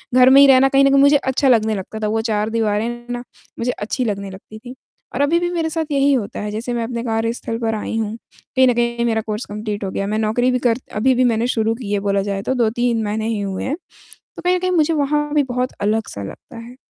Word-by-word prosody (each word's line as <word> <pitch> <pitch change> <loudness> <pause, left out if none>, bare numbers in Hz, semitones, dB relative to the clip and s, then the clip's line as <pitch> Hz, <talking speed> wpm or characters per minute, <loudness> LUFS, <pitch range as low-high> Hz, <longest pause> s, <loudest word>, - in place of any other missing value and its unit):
घर 255 0 +7
में 275 +1 +7
ही 280 - +8
रहना 270 0 +6
कहीं 275 0 +4
न - - +5
कहीं 275 0 +4
मुझे 285 +1 +6
अच्छा 265 0 0
लगने 220 -2 +3
लगता 205 +3 -6
था - - +1
वो 220 +1 0
4 210 0 0
दीवारें 220 -1 0 0.2
ना 245 0 -4 0.4
मुझे 245 +2 0
अच्छी 245 +5 -3
लगने 200 -2 -3
लगती 210 +3 -12
थी। 250 +2 -10 0.4
और 280 - 0
अभी 325 +4 +3
भी 350 0 -1
मेरे 330 -2 -1
साथ 320 0 -2
यही 280 0 +3
होता 230 -7 -2
है 210 0 -4
जैसे 235 +3 -4
मैं 235 - -1
अपने 235 0 -4
कार्यस्थल 230 0 -2
पर 225 -1 -1
आई 220 +1 -3
हूँ। 220 0 -2 0.4
कहीं 260 0 +5
न 245 - +4
कहीं 235 0 0
मेरा 225 -1 +1
कोर्स 215 +2 -4
कंप्लीट 210 -1 -4
हो 190 - -3
गया। 195 +1 -2
मैं 215 +1 -1
नौकरी 235 +4 +1
भी 250 - 0
कर 235 +2 +1 0.2
अभी-अभी 255 +3 +3
मैंने 230 0 +1
शुरू 225 -2 0
की 225 -4 -7
है 200 - +1
बोला 200 0 +2
जाए 200 -1 -3
तो - - +3
2-3 235 -1 +1
महीने 215 +1 -2
ही 225 -2 -1
हुए 195 -2 -3
हैं, 275 - -1 0.6
तो - - -6
कहीं 360 0 +2
न - - -4
कहीं 370 0 -1
मुझे 325 -2 +2
वहाँ 295 0 0
भी 295 -1 +3
बहुत 250 0 -2
अलग-सा 210 - -1
लगता 230 - -10
है। 235 +2 -10
235 Hz, 255 wpm, -19 LUFS, 215-260 Hz, 0.6 s, ही